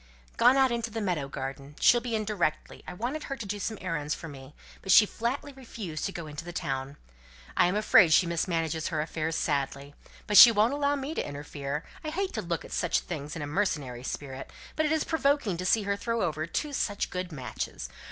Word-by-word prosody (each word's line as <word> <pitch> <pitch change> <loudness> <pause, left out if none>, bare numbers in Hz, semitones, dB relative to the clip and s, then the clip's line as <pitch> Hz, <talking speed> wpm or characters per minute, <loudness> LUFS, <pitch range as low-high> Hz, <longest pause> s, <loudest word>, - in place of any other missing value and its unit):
"Gone 250 +3 +5
out 265 -2 +4
into 235 -1 -2
the 225 +1 -4
meadow 175 -9 -1
garden. 135 +1 -6
She'll 240 - +5
be 235 -1 -2
in 215 -1 -1
directly. 175 -7 -2
I - - -5
wanted 255 +10 -3
her 275 - -4
to 230 - -6
do 205 +1 -4
some 220 +2 -3
errands 150 -5 -2
for 165 - -8
me, 135 -1 -11 0.3
but 190 - -1
she 210 - +9
flatly 250 +7 -3
refused 225 -11 -6
to 195 - -2
go 170 -3 -6
into 150 +2 -7
the 175 - -7
town. 140 -5 -4 0.6
I - - +5
am 180 - 0
afraid 210 -4 +6
she 175 - +6
mismanages 165 -2 -1
her 160 -3 -2
affairs 160 +1 -2
badly. 140 -1 -2 0.3
But 210 - +3
she 235 - +12
won't 220 +4 +3
allow 285 0 +1
me 280 +2 -4
to - - -1
interfere. 145 0 -5 0.2
I 310 - -3
hate 380 +4 -2
to 220 - -2
look 170 -3 -3
at - - -12
such 175 - +1
things 150 -2 -6
in 160 - -4
a - - -2
mercenary 145 -7 -1
spirit, 135 0 -6 0.3
but 310 0 +1
it - - -1
is 315 -1 +2
provoking 280 - +1
to 185 +1 -2
see 220 +1 +3
her 200 0 0
throw 230 +2 -1
over 155 -2 -2
two 295 - -3
such 205 -6 -1
good 180 -1 -4
matches. 130 - -5
180 Hz, 220 wpm, -28 LUFS, 150-230 Hz, 0.6 s, she